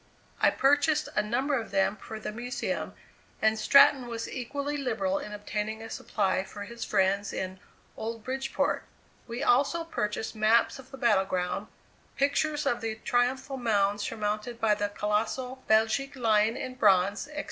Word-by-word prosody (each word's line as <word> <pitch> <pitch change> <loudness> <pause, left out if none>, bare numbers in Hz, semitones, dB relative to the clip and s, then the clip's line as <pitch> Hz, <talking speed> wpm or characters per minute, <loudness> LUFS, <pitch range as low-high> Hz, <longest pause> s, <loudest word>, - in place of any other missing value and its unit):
I - - +6
purchased 290 +2 +2
a - - +4
number 245 +7 -1
of 220 - -9
them 195 +1 +1
for 220 +1 -8
the 215 - -5
Museum, 245 +4 -4 0.4
and 220 0 +2
Stratton 280 +2 +6
was 230 -1 -4
equally 280 +3 -4
liberal 220 -9 -1
in 210 - -7
obtaining 210 +1 -4
a 225 - -9
supply 190 -2 0
for 205 +1 -8
his 235 +3 -7
friends 195 +2 +1
in 185 0 -4 0.4
"Old 225 0 -5
Bridgeport." 265 +1 -1 0.4
We 240 +3 -4
also 280 +7 +3
purchased 220 -9 -3
maps 220 +4 +3
of 260 -1 -13
the 270 - -10
battle 215 -6 +3
ground, 185 +2 -2 0.5
pictures 295 +2 +1
of 240 -4 0
the 225 -1 -2
triumphal 250 +4 0
mound 205 -4 +1
surmounted 215 +2 -3
by 220 -2 +3
the 205 0 -1
colossal 220 +6 -2
Belgic 220 +6 +2
Lion 225 -1 +2
in 255 - -5
bronze, 200 0 +3
etc. 300 0 -6
225 Hz, 160 wpm, -28 LUFS, 210-265 Hz, 0.5 s, I